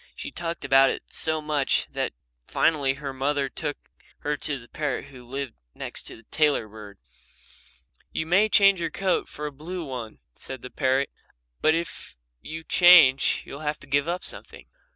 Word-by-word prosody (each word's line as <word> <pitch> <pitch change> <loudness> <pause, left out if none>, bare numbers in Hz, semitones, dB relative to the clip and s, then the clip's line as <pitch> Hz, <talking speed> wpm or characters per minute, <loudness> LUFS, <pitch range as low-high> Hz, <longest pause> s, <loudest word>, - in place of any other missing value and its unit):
She 290 - -7
talked 170 - -4
about 135 0 +6
it - - -6
so 155 -1 +1
much 150 -3 +1
that - - -2 0.3
finally 140 -4 +2
her 140 -1 -6
mother 140 +1 0
took 150 +1 -4 0.4
her 150 +1 -1
to 140 0 -3
the 120 -2 -14
parrot 145 -1 -3
who 130 -3 -13
lived 135 0 -5 0.2
next - - -6
to - - -8
the 115 - -16
tailor 150 -7 +2
bird. 105 -2 -11 1.1
"You 160 - -2
may 190 +6 +4
change 195 -3 +5
your 165 - -1
coat 190 +3 0
for 150 - -6
a 150 - -3
blue 165 +5 -6
one," 125 -5 -6 0.2
said 130 -2 -8
the 125 - -8
parrot, 135 0 +1 0.5
"but 155 - +4
if 170 +1 -5 0.3
you 160 +1 -7
change 165 -7 +6
you'll 140 - -8
have 150 0 -3
to - - -10
give 140 +2 +1
up 175 +1 -2
something." - - -5
145 Hz, 175 wpm, -26 LUFS, 135-160 Hz, 1.1 s, about